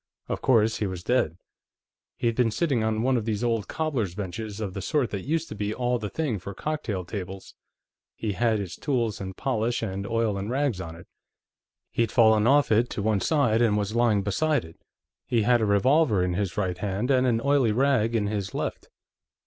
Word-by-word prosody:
Of -, -, -3 dB
course, 110 Hz, -3 st, +3 dB
he 105 Hz, -, -1 dB
was 90 Hz, -2 st, -6 dB
dead. 105 Hz, -10 st, +1 dB, 0.8 s
He'd 115 Hz, -1 st, 0 dB
been 125 Hz, -2 st, +3 dB
sitting 130 Hz, -1 st, 0 dB
on 110 Hz, 0 st, 0 dB
one 130 Hz, 0 st, +2 dB
of 110 Hz, -, -2 dB
these 110 Hz, 0 st, -2 dB
old 115 Hz, -5 st, 0 dB
cobblers' 130 Hz, -, -2 dB
benches 105 Hz, +2 st, -5 dB
of 100 Hz, -4 st, -4 dB
the 100 Hz, -, -5 dB
sort 140 Hz, -, 0 dB
that 100 Hz, +4 st, -5 dB
used 165 Hz, +1 st, 0 dB
to -, -, -5 dB
be 105 Hz, +1 st, -2 dB
all 125 Hz, -1 st, 0 dB
the 105 Hz, -1 st, -4 dB
thing 135 Hz, -5 st, -2 dB
for 100 Hz, +2 st, -8 dB
cocktail 110 Hz, -, -3 dB
tables; 95 Hz, 0 st, -7 dB, 0.6 s
he 110 Hz, -, -2 dB
had 110 Hz, +3 st, +1 dB
his 100 Hz, -4 st, -5 dB
tools 120 Hz, -8 st, -1 dB
and 95 Hz, -1 st, -6 dB
polish 120 Hz, -2 st, -1 dB
and 100 Hz, -1 st, -3 dB
oil 115 Hz, -3 st, 0 dB
and 100 Hz, +2 st, -4 dB
rags 130 Hz, -6 st, 0 dB
on 80 Hz, -2 st, -7 dB
it. 85 Hz, -, -13 dB, 0.9 s
He'd 115 Hz, -2 st, 0 dB
fallen 110 Hz, -2 st, +5 dB
off 145 Hz, 0 st, +4 dB
it 115 Hz, +3 st, +3 dB
to 100 Hz, -, -4 dB
one 105 Hz, -2 st, +1 dB
side 125 Hz, -, +2 dB
and 110 Hz, -3 st, +3 dB
was 105 Hz, +1 st, -2 dB
lying 115 Hz, -4 st, +3 dB
beside 145 Hz, -, +1 dB
it. 80 Hz, +1 st, -15 dB, 0.5 s
He 120 Hz, -4 st, +2 dB
had 120 Hz, +2 st, +3 dB
a 110 Hz, -, +1 dB
revolver 110 Hz, -, +3 dB
in 90 Hz, -1 st, 0 dB
his 95 Hz, -1 st, -2 dB
right 90 Hz, -3 st, -1 dB
hand, 105 Hz, +6 st, -1 dB
and 130 Hz, -1 st, +3 dB
an 115 Hz, -2 st, +2 dB
oily 140 Hz, -3 st, +2 dB
rag 120 Hz, -2 st, +2 dB
in 105 Hz, -2 st, +1 dB
his 100 Hz, -2 st, -3 dB
left." -, -, -4 dB
110 Hz, 205 wpm, -26 LUFS, 100-125 Hz, 0.9 s, fallen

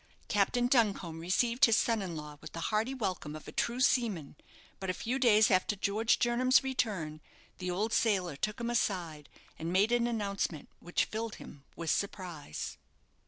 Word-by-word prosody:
Captain 210 Hz, +4 st, +2 dB
Duncombe 205 Hz, -10 st, +1 dB
received 230 Hz, -, +3 dB
his 230 Hz, -1 st, +4 dB
son 230 Hz, -2 st, +2 dB
in 180 Hz, -4 st, -4 dB
law 150 Hz, -1 st, -8 dB
with -, -, -10 dB
the 165 Hz, -, -5 dB
hearty 220 Hz, +4 st, +1 dB
welcome 185 Hz, -, -3 dB
of 155 Hz, -, -10 dB
a -, -, -7 dB
true 240 Hz, +1 st, -1 dB
seaman; 215 Hz, -, +1 dB, 0.4 s
but 190 Hz, -, -4 dB
a 185 Hz, -, 0 dB
few 250 Hz, +7 st, -2 dB
days 220 Hz, -4 st, +5 dB
after 185 Hz, +2 st, +2 dB
George 215 Hz, +3 st, +1 dB
Jernam's 255 Hz, +3 st, +3 dB
return, 195 Hz, -13 st, -2 dB, 0.4 s
the 180 Hz, -1 st, -3 dB
old 210 Hz, +5 st, -1 dB
sailor 190 Hz, -8 st, +1 dB
took 210 Hz, +10 st, -3 dB
him 235 Hz, 0 st, -2 dB
aside, 170 Hz, -, -1 dB, 0.3 s
and 165 Hz, +1 st, -3 dB
made 200 Hz, +5 st, +3 dB
an 240 Hz, 0 st, +3 dB
announcement 200 Hz, -8 st, -2 dB
which 175 Hz, -, 0 dB
filled 225 Hz, 0 st, -4 dB
him 140 Hz, -1 st, -12 dB
with 170 Hz, -1 st, -2 dB
surprise. 180 Hz, -, -4 dB
205 Hz, 170 wpm, -31 LUFS, 170-235 Hz, 0.4 s, days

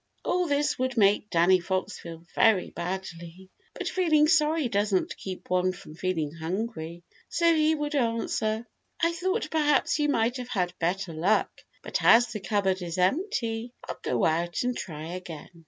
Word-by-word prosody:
All 360 Hz, -1 st, +1 dB
this 290 Hz, -1 st, 0 dB
would 260 Hz, -1 st, -1 dB
make 205 Hz, 0 st, +3 dB
Danny 180 Hz, +1 st, +4 dB
Fox 185 Hz, +3 st, -3 dB
feel 165 Hz, -1 st, -9 dB
very 215 Hz, -5 st, +3 dB
badly. 175 Hz, 0 st, -6 dB, 0.2 s
But -, -, -4 dB
feeling 310 Hz, -5 st, +3 dB
sorry 310 Hz, -2 st, +3 dB
doesn't 205 Hz, -3 st, 0 dB
keep 185 Hz, -1 st, -8 dB
one 185 Hz, 0 st, +2 dB
from 180 Hz, -4 st, -12 dB
feeling 165 Hz, -3 st, -2 dB
hungry. 170 Hz, 0 st, -4 dB, 0.3 s
So 335 Hz, -1 st, +3 dB
he 315 Hz, 0 st, +3 dB
would 295 Hz, 0 st, -3 dB
answer, 230 Hz, -3 st, 0 dB, 0.3 s
"I 335 Hz, 0 st, +2 dB
thought 375 Hz, +5 st, -2 dB
perhaps 295 Hz, -2 st, +2 dB
you 295 Hz, 0 st, +2 dB
might 240 Hz, -1 st, +1 dB
have 250 Hz, -1 st, -7 dB
had 180 Hz, -6 st, -1 dB
better 175 Hz, +1 st, -1 dB
luck, 180 Hz, +7 st, +2 dB, 0.3 s
but -, -, -2 dB
as 240 Hz, +1 st, +6 dB
the 215 Hz, -, -4 dB
cupboard 190 Hz, -1 st, 0 dB
is 170 Hz, 0 st, -4 dB
empty, 230 Hz, -, 0 dB
I'll -, -, -6 dB
go 120 Hz, -, 0 dB
out 170 Hz, +4 st, 0 dB
and 250 Hz, 0 st, -1 dB
try 160 Hz, -5 st, -6 dB
again." 175 Hz, -4 st, -8 dB
205 Hz, 165 wpm, -27 LUFS, 175-270 Hz, 0.3 s, as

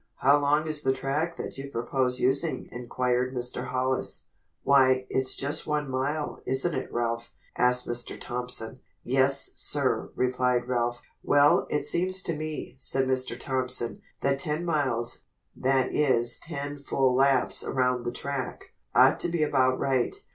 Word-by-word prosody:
"How 140 Hz, +2 st, +4 dB
long 145 Hz, +2 st, +2 dB
is 155 Hz, -1 st, +1 dB
the 130 Hz, -3 st, +2 dB
track 145 Hz, +6 st, -2 dB
that -, -, -7 dB
you 140 Hz, 0 st, -6 dB
propose 125 Hz, +1 st, -1 dB
using?" 140 Hz, +6 st, +1 dB
inquired 125 Hz, +1 st, -1 dB
Mr. 125 Hz, 0 st, -2 dB
Hollis. 130 Hz, +1 st, -2 dB, 0.3 s
"Why, 130 Hz, -2 st, +4 dB
it's 130 Hz, 0 st, +1 dB
just 140 Hz, +2 st, -2 dB
one 150 Hz, -2 st, -1 dB
mile, 145 Hz, +4 st, -2 dB
isn't 135 Hz, +7 st, 0 dB
it 130 Hz, -, -4 dB
Ralph?" 115 Hz, 0 st, -2 dB, 0.2 s
asked 125 Hz, 0 st, +2 dB
Mr. 120 Hz, 0 st, -3 dB
Thompson. 125 Hz, -1 st, -4 dB, 0.2 s
"Yes, 135 Hz, +2 st, +2 dB
sir," -, -, 0 dB
replied 125 Hz, -1 st, +1 dB
Ralph. 120 Hz, -1 st, -1 dB, 0.2 s
"Well, 145 Hz, 0 st, +4 dB
it 150 Hz, -, -1 dB
seems 180 Hz, +4 st, +2 dB
to 165 Hz, -, -2 dB
me," 155 Hz, 0 st, -5 dB
said 135 Hz, 0 st, +1 dB
Mr. 130 Hz, -2 st, -1 dB
Thompson, 125 Hz, -5 st, -2 dB, 0.2 s
"that 140 Hz, 0 st, +1 dB
ten 150 Hz, +4 st, -2 dB
miles, 130 Hz, -8 st, -1 dB, 0.3 s
that 130 Hz, 0 st, +1 dB
is 125 Hz, -5 st, +2 dB
ten 145 Hz, -3 st, -6 dB
full 135 Hz, -2 st, +1 dB
laps 135 Hz, 0 st, +3 dB
around 125 Hz, -1 st, 0 dB
the 120 Hz, -, -2 dB
track, 140 Hz, +1 st, -5 dB, 0.2 s
ought -, -, +6 dB
to -, -, -1 dB
be 170 Hz, -2 st, 0 dB
about 130 Hz, -3 st, +2 dB
right. 130 Hz, -3 st, 0 dB
130 Hz, 150 wpm, -27 LUFS, 125-145 Hz, 0.3 s, ought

